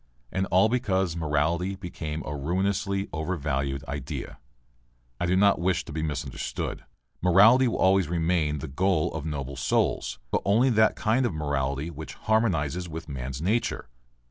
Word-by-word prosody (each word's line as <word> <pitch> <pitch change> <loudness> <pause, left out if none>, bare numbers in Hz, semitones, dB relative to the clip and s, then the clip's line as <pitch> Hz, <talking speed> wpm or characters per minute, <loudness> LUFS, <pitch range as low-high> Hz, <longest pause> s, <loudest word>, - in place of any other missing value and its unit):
And 95 0 -1
all 95 +4 +4
because 95 -7 0
morality 85 +4 0
became 80 -5 -5
a 75 - -4
ruinously 95 +6 -1
overvalued 70 -4 -2
idea. 70 0 -5 0.8
I 85 - 0
do 90 - +2
not 100 +1 +4
wish 90 0 0
to - - -9
be 80 +1 -3
misunderstood. 75 -2 -4 0.4
Morality 105 +9 +6
will 115 - -1
always 95 -2 +3
remain 80 -2 0
the 75 - -5
goal 85 +3 +1
of 80 -1 -4
noble 70 -3 -4
souls, 65 - 0
but - - +1
only 115 +6 +3
that 110 -1 +4
kind 115 +5 +1
of 120 -10 -1
morality 70 0 -1
which 80 -3 -8
harmonizes 90 -6 0
with 80 +1 -7
man's 65 0 -5
nature. 105 - -1
85 Hz, 150 wpm, -27 LUFS, 75-95 Hz, 0.8 s, Morality